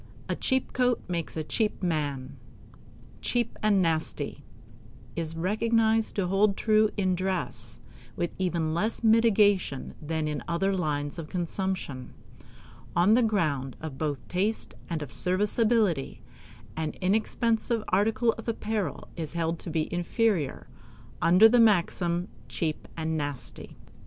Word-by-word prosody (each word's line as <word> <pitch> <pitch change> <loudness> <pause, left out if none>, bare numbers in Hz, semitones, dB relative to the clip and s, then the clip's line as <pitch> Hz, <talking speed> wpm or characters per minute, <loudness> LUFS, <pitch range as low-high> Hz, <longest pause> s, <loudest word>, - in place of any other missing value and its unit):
"A - - -1
cheap 260 -1 -1
coat 250 -1 +2
makes 170 -3 -3
a 155 - -1
cheap 210 +5 -1
man." 145 -6 -2 0.9
"Cheap 240 -2 -1
and 205 -3 +3
nasty" 155 -3 -2 0.7
is 165 -1 -3
recognized 220 +4 +1
to 195 - +1
hold 195 +2 +2
true 215 -1 +4
in 185 -2 +2
dress 170 - -3 0.4
with 175 -1 -1
even 170 -4 0
less 215 +8 -1
mitigation 210 - +3
than 155 0 -2
in 150 -1 -2
other 195 +4 +1
lines 150 -3 -2
of 155 - -7
consumption. 175 -7 -3 0.8
On 180 +5 +5
the 245 - +5
ground 155 - 0 0.2
both 150 -3 -1
of 125 - -23
taste 200 +5 -1 0.2
and 160 -3 -2
of 135 - -9
serviceability, 205 - +1 0.5
an 155 -1 -2
inexpensive 225 +3 +1
article 220 +4 +3
of 225 - -9
apparel 215 -3 -2
is 160 -3 -5
held 165 -1 -1
to - - -6
be 155 -1 0
inferior, 175 - 0 0.6
under 180 +6 +7
the 240 +2 +4
maxim 175 -4 +3 0.2
"cheap 155 -3 -3
and 160 0 -1
nasty." 145 -3 -6
180 Hz, 130 wpm, -28 LUFS, 160-215 Hz, 0.9 s, under